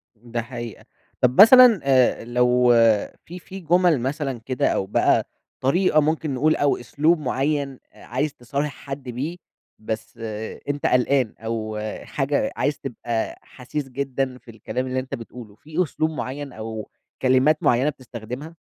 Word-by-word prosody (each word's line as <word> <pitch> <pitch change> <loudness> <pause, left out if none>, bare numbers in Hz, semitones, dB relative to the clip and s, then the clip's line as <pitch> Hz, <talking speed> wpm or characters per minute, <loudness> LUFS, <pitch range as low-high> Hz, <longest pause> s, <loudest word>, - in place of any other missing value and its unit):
ده 120 +1 -5
حقيقة. 120 -2 -8 0.4
طب 125 +8 +6
مثلًا 245 -1 +9
آآ 130 -4 +3
لو 125 0 +3 0.6
في 180 +2 -9
في 190 +2 -10
جُمل 175 -3 +3
مثلًا 135 -1 -2
كده 130 -1 0
أو 95 - 0
بقى 100 - +2 0.4
طريقة 155 +3 +3
ممكن 155 -1 -1
نقول 155 +5 +2
أو 145 -1 +2
أسلوب 155 +7 +1
مُعين 140 0 -1
أ - - -16
عايز 135 +5 -2
تصارح 140 +5 -3
حد 135 -1 -8
بيه، 135 +8 -4 0.4
بس 110 +2 -5 0.5
أنت 145 0 -2
قلقان 125 -2 +2
أو 110 -1 -4 0.3
حاجة 140 0 -1
عايز 145 +3 0
تبقى 120 -3 -4
حسيس 135 +2 -6
جدًا 135 -1 -2
في 120 - -14
الكلام 125 +4 -4
اللي 130 0 -1
أنت 130 - -5
بتقوله، 115 -2 -11
في 160 +8 -2
أسلوب 155 0 -1
مُعين 140 -1 -5
أو 110 0 -6 0.3
كلمات 130 +4 +3
مُعينة 130 +5 +3
بتستخدمها؟ 130 +4 -8
130 Hz, 145 wpm, -23 LUFS, 120-150 Hz, 0.6 s, مثلًا